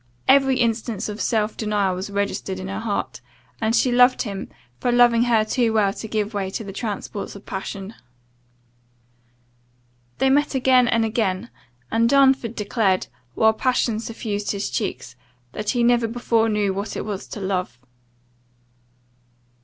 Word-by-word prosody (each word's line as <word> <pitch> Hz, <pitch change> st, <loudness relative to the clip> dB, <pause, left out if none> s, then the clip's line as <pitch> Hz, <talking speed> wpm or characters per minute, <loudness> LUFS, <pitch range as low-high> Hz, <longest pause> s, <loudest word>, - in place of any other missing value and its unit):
Every 270 Hz, -1 st, +5 dB
instance 230 Hz, -3 st, -1 dB
of 210 Hz, +1 st, -5 dB
self 220 Hz, -2 st, 0 dB
denial 210 Hz, -3 st, 0 dB
was 185 Hz, +2 st, -5 dB
registered 200 Hz, -1 st, -2 dB
in 190 Hz, 0 st, -6 dB
her 195 Hz, +2 st, -4 dB
heart, 220 Hz, -2 st, -3 dB, 0.4 s
and 225 Hz, +1 st, +1 dB
she 250 Hz, -, +3 dB
loved 250 Hz, +1 st, +5 dB
him, 200 Hz, -5 st, -6 dB, 0.3 s
for 245 Hz, -, 0 dB
loving 240 Hz, -1 st, +5 dB
her 225 Hz, -3 st, +3 dB
too 230 Hz, 0 st, +1 dB
well 205 Hz, -3 st, +2 dB
to 220 Hz, -, -7 dB
give 215 Hz, 0 st, -2 dB
way 195 Hz, -2 st, -2 dB
to 205 Hz, -, -5 dB
the 195 Hz, -2 st, -8 dB
transports 205 Hz, -1 st, -5 dB
of 200 Hz, -, -12 dB
passion. 195 Hz, +1 st, -6 dB, 2.2 s
They 265 Hz, -, +3 dB
met 290 Hz, +1 st, +2 dB
again 255 Hz, -1 st, +4 dB
and 230 Hz, -1 st, +2 dB
again; 215 Hz, -1 st, -1 dB, 0.4 s
and 230 Hz, +1 st, +3 dB
Darnford 265 Hz, -4 st, +3 dB
declared, 205 Hz, -3 st, 0 dB, 0.3 s
while 220 Hz, 0 st, +4 dB
passion 235 Hz, -1 st, 0 dB
suffused 215 Hz, -3 st, -3 dB
his 200 Hz, 0 st, -3 dB
cheeks, 125 Hz, -, -4 dB, 0.4 s
that 210 Hz, 0 st, -4 dB
he 240 Hz, -1 st, +1 dB
never 240 Hz, -1 st, +3 dB
before 230 Hz, -1 st, +1 dB
knew 210 Hz, -2 st, +1 dB
what 200 Hz, +2 st, -4 dB
it -, -, -4 dB
was 205 Hz, -2 st, -5 dB
to -, -, -7 dB
love. 185 Hz, -10 st, -2 dB
220 Hz, 155 wpm, -22 LUFS, 200-240 Hz, 2.2 s, Every